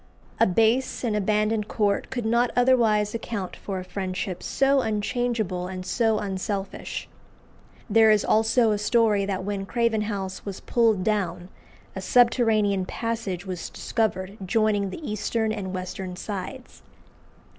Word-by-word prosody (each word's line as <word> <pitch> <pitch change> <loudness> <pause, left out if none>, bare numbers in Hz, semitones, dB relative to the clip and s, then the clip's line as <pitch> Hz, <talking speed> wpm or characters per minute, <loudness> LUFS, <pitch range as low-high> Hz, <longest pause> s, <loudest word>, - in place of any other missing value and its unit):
A - - +5
base 225 +9 +2
and 225 -4 0
abandoned 210 +1 +1
court 205 -2 0
could 245 -3 -3
not 235 +2 +3
otherwise 230 -5 +3
account 225 -5 -4
for 195 -2 -5
a 185 - -4
friendship 185 -1 -4
so 275 0 +2
unchangeable 215 -4 -1
and 185 0 -6
so 225 +1 +1
unselfish. 195 0 -4 0.8
There 220 0 +5
is 215 -1 +4
also 225 +1 +3
a 210 - 0
story 210 -2 +3
that 190 -2 -2
when 195 0 -3
Craven 230 -2 +1
House 195 -3 -4
was 200 -2 -6
pulled 225 -5 +2
down, 185 -4 -1 0.5
a 190 - -4
subterranean 215 -4 +3
passage 220 -6 -3
was 185 -3 -5
discovered 205 -3 -2
joining 205 0 +1
the 300 - -7
eastern 215 +1 -1
and 200 -4 -4
western 185 0 -5
sides. 210 +7 -7
210 Hz, 135 wpm, -25 LUFS, 190-230 Hz, 0.8 s, A